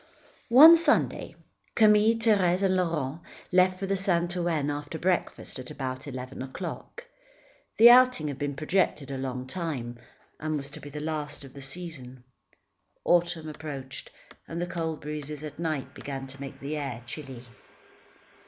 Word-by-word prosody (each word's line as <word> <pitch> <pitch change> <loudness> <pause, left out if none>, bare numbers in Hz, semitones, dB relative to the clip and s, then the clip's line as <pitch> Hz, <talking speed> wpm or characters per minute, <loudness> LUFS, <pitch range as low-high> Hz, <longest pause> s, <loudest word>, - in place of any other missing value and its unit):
One 310 +8 +10
Sunday, 335 - +1 0.4
Camille, 215 +1 +5
Thérèse 200 -5 +2
and 190 -1 +3
Laurent 165 -4 -1 0.3
left 185 0 +4
for 195 +1 -1
Saint 175 -2 +1
Ouen 165 -5 0
after 145 +2 -5
breakfast, 180 -5 -2
at 125 - -8
about 130 0 -5
eleven 130 -1 -7
o'clock. 175 - -7 0.7
The 235 +2 +10
outing 250 -10 +5
had 140 -2 -5
been 145 -1 -2
projected 155 -2 0
a 135 - -4
long 130 -1 -4
time, 130 -6 -5 0.4
and 155 0 -2
was 140 0 -7
to - - -8
be 145 - -9
the 150 +1 -7
last 150 -1 -4
of 135 - -12
the 140 - -10
season. 135 -4 -6 0.8
Autumn 175 -2 +2
approached, 145 -3 -7 0.4
and 165 - -5
the 175 - -1
cold 165 -3 -4
breezes 150 0 -6
at 150 0 -8
night, 155 -5 -3
began 135 -1 -6
to 135 +1 -11
make 135 -1 -8
the 145 +2 -4
air 130 -5 -5
chilly. 130 -2 -8
155 Hz, 155 wpm, -27 LUFS, 135-180 Hz, 0.8 s, One